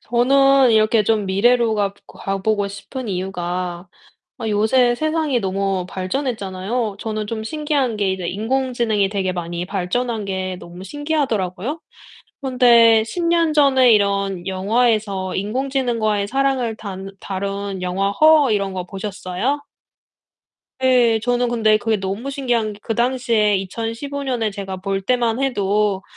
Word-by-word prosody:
저는 270 +2 +4
이렇게 215 0 +4
좀 210 -1 +1
미래로 230 +4 +3
가 200 -2 0
가 195 0 -4
보고 205 0 0
싶은 220 +5 -7
이유가 180 -1 -4 0.5
아 225 - -4
요새 240 +4 +3
세상이 310 -2 0
너무 195 -1 -1
발전했잖아요. 205 0 -3
저는 215 -1 -3
좀 220 0 -4
신기한 285 -3 -1
게 200 -2 +1
이제 185 -2 -3
인공지능이 225 -1 0
되게 195 -2 -1
많이 175 0 -4
발전한 210 +4 -2
게 190 -1 -3
너무 175 +1 -10
신기하더라고요. 265 - -2 0.6
그런데 235 -4 +5
10 340 +10 -4
년 335 -2 +2
전에 265 -5 +5
이런 200 -3 +1
영화에서 200 -1 0
인공지능과의 230 -2 -1
사랑을 265 -3 0
단 195 -2 -7
다룬 195 0 -4
영화 195 +2 -1
Her 305 -6 +6
이런 200 -2 0
거 185 -1 -4
보셨어요? 205 +7 -3 1.2
예. 245 -4 +4
저는 245 0 +1
근데 220 -2 +3
그게 220 0 0
너무 195 +8 -4
신기한 245 -6 -1
게 205 - -14
그 225 - -2
당시에 235 -4 +2
2015 230 +8 -4
년에 240 -5 -1
제가 195 -1 -6
볼 195 +1 -2
때만 240 +1 0
해도 205 -6 0
215 Hz, 285 characters per minute, -20 LUFS, 195-250 Hz, 1.2 s, Her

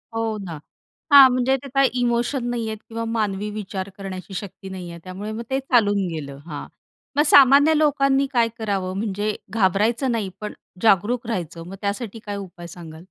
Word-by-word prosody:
हो 225 -1 -1
ना. 165 -4 -6 0.6
हां. 275 -2 +11
म्हणजे 255 +1 +2
ते 275 - -7
काय 275 -1 +5
इमोशन 240 +2 0
नाहीये 230 -2 -2
किंवा 230 +1 -6
मानवी 210 -3 -1
विचार 200 -2 -5
करण्याची 195 -1 -7
शक्ती 190 0 -7
नाहीये. 180 -3 -7
त्यामुळे 195 +4 -6
मग 230 +2 -5
ते 265 0 +1
चालून 205 -7 +2
गेलं. 140 -3 -6
हां. 150 -3 -6 0.5
मग 295 - +4
सामान्य 285 +2 +7
लोकांनी 275 -2 +3
काय 235 -2 +4
करावं 195 -3 -2
म्हणजे 205 0 -2 0.2
घाबरायचं 225 +5 +2
नाही, 220 -5 -1
पण 210 - -5 0.3
जागरूक 225 +3 +3
राहायचं. 175 -7 -4
मग 195 - -8
त्यासाठी 205 +2 -3
काय 205 -1 -4
उपाय 175 -3 -9
सांगाल? 165 -2 -10
215 Hz, 165 wpm, -22 LUFS, 190-240 Hz, 0.6 s, हां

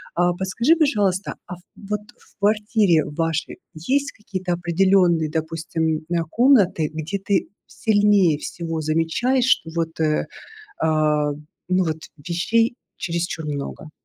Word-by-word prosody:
А, 175 0 +2
подскажи, 210 - +2
пожалуйста, 205 - +1
а 180 - -8 0.2
вот 210 0 -4 0.2
в - - -26
квартире 210 -4 +2
вашей 160 +1 -2 0.2
есть 275 - 0
какие-то 185 -4 -4
определённые, 175 -2 +2
допустим, 160 0 -2
на 170 -1 +1
комнаты, 200 - +3
где 160 +6 -4
ты 195 0 0 0.2
сильнее 205 -7 +3
всего 165 -1 -4
замечаешь, 165 - +1
что 165 -10 +2
вот, 165 -1 -2
э, 155 -1 +1 0.5
а, 150 -2 +2 0.4
ну, 185 0 +2
вот 160 -1 -1 0.2
вещей 190 +10 +1 0.2
чересчур 170 -1 -3
много? 150 +1 -5
175 Hz, 120 wpm, -22 LUFS, 160-205 Hz, 0.5 s, комнаты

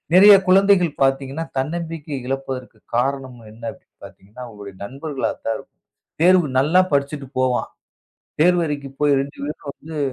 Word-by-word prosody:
நிறையா 200 +2 +9
குழந்தைகள் 185 -3 +4
பாத்தீங்கன்னா, 135 +3 0
தன்னம்பிக்கை 160 0 -3
இழப்பதற்குக் 130 -4 -5
காரணம் 130 0 -1
என்னா? 115 +1 -7
அப்படின்னு - - -21
பாத்தீங்கன்னா, 105 +6 -13
அவுங்களோட 105 -3 -10
நண்பர்களாத்தான் 135 -3 -3
இருக்கும். - - -17 0.4
தேர்வு 180 -2 +5
நல்லா 160 +7 +4
படிச்சிட்டு 140 -1 -1
போவான். 130 -1 +1 0.7
தேர்வறைக்குப் 150 -6 0
போய் 145 -2 +4
2 140 +1 -9
பேரும் 150 -1 -6
வந்து, 160 0 -9
140 Hz, 125 wpm, -21 LUFS, 130-165 Hz, 0.7 s, நிறையா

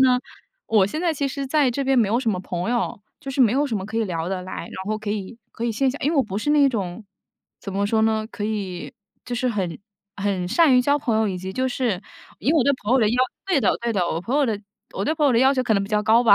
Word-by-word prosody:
呢， 255 -1 +5 0.5
我 210 -4 +4
现 305 +11 -4
在 345 -2 +1
其 280 -2 -1
实 275 0 -4
在 280 -1 +3
这 275 +3 -2
边 265 -1 +3
没 220 -4 +3
有 225 +4 +2
什 245 -3 0
么 185 -3 -2
朋 180 +2 -3
友， 240 -3 -1 0.2
就 275 - -6
是 270 - -1
没 230 -4 +5
有 285 +3 +2
什 235 -6 -2
么 190 - -4
可 220 +1 -5
以 225 - +2
聊 170 -3 -3
得 190 -1 -3
来， 185 - -8
然 170 - -7
后 215 0 -1
可 215 -1 -4
以 210 +2 -4
可 235 - -5
以 235 - +1
线 265 +4 +1
下 280 - -7
因 285 - +2
为 330 - 0
我 275 - +5
不 200 -5 -5
是 295 - -1
那 290 -2 +5
种， 210 -4 -4 0.6
怎 195 - -6
么 200 +1 0
说 220 +1 +2
呢？ 220 0 +1
可 205 - -7
以 200 -5 -4 0.3
就 245 - -4
是 250 +1 0
很 190 -8 -2 0.4
很 195 -3 -1
善 310 - +5
于 - - +6
交 285 +3 +2
朋 235 -6 0
友， 220 -1 +2
以 185 - -3
及 190 +1 -6
就 260 +5 0
是 235 -7 -1 0.4
以 275 - +1
我 310 -6 +3
对 280 - +4
朋 210 +4 0
友 265 - +5
的 220 -4 +3
要 235 - 0 0.3
对 365 -7 +2
的 205 - +2
对 235 0 -1
的， 190 -5 +1
我 165 - -2
朋 240 +10 -1
友 295 - +4
的 220 -4 -1 0.4
我 195 - -2
对 310 - +1
朋 305 -2 +1
友 270 - +4
的 230 - +4
要 265 +3 +5
求 255 - +1
可 230 -3 +1
能 200 - +2
比 195 - -6
较 210 -1 +1
高 225 +2 +5
吧。 215 - +8
225 Hz, 325 characters per minute, -23 LUFS, 200-265 Hz, 0.6 s, 吧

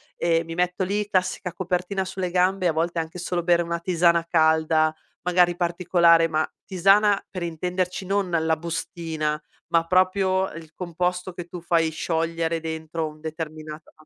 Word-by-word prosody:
e 165 -1 +1
mi 165 0 -7
metto 180 +2 0
lì, 205 +2 -1
classica 185 -2 -1
copertina 185 +2 -2
sulle 185 -1 -3
gambe 185 +1 +1
e 175 - +5
a - - 0
volte 165 +1 -1
anche 160 +2 -5
solo 175 0 -2
bere 170 0 +3
una 170 0 -3
tisana 170 -1 +2
calda, 160 -1 +3 0.3
magari 180 0 +3
particolare, 170 -1 +3
ma 155 -1 0 0.2
tisana 195 +2 +3
per 185 - -5
intenderci 180 +3 -2
non 195 0 0
la 160 -2 +1
bustina, 160 -2 -3 0.3
ma 165 0 +2
proprio 185 +1 +2
il 160 -1 -10
composto 180 +1 -2
che 175 -1 -7
tu 175 0 -9
fai 165 -1 +2
sciogliere 165 +1 -1
dentro 160 0 -4
un 155 0 -11
determinato 155 0 -7
170 Hz, 160 wpm, -24 LUFS, 160-180 Hz, 0.3 s, e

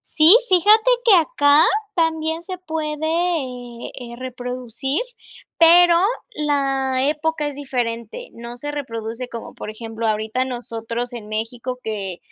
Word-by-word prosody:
Sí, 335 +6 +6
fíjate 420 +7 +5
que 440 -5 +7
acá, 295 -2 +5 0.3
también 320 0 0
se 370 -1 -7
puede, 315 -3 -4
eh 260 -9 -2
eh 240 -1 -9
reproducir, 255 +2 -4 0.6
pero, 340 +1 +7 0.4
la 270 -3 0
época 305 0 -1
es 285 - -7
diferente. 245 - -4
No 235 +1 -9
se 290 +2 -5
reproduce 235 -3 -5
como, 230 -1 -8
por 215 - -7
ejemplo, 225 +1 -5
ahorita 220 +4 0
nosotros 240 -1 -5
en 220 -3 -8
México, 235 +3 -4
que 195 -5 -4
260 Hz, 125 wpm, -21 LUFS, 235-320 Hz, 0.6 s, que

